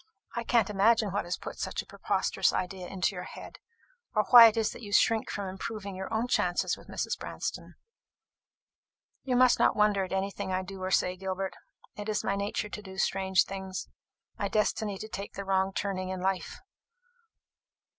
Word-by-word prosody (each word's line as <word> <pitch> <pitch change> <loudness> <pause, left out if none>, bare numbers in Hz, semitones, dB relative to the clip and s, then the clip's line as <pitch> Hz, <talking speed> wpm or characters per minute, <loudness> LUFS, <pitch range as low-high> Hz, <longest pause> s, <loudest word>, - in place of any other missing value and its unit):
I 235 - -2
can't 230 -3 +2
imagine 210 +1 +3
what 200 - -1
has 175 - -2
put - - -8
such - - -3
a - - -22
preposterous - - 0
idea 185 0 -3
into 190 +1 -1
your 180 -1 -6
head, - - -10 0.6
or 215 - +4
why 240 -2 +12
it 225 - 0
is 220 -1 +1
that - - -10
you 205 -3 -8
shrink 225 +2 +3
from 200 -1 -3
improving 195 +1 -5
your 190 0 -6
own 225 +2 0
chances 180 -7 +1
with - - -16
Mrs. - - -3
Branston." - - -5 1.5
"You 255 -2 -1
must 250 0 +5
not - - +4
wonder 210 -2 +3
at 185 - -6
anything 195 +1 -2
that 185 - 0
I - - -1
do 190 0 -8
or 185 - -2
say, 180 -1 +2
Gilbert. 190 0 -3 0.4
It 205 +1 -6
is 210 - 0
my 195 - 0
nature 200 +1 -2
to 210 - -6
do 190 -2 -11
strange 190 0 +2
things 190 -1 -6 0.5
my 200 - 0
destiny 210 0 0
to 215 - -7
take 200 -2 -6
the 200 - -6
wrong 190 0 +1
turning 190 -2 -2
in 185 0 -3
life!" 190 -1 -2
195 Hz, 190 wpm, -29 LUFS, 190-210 Hz, 1.5 s, why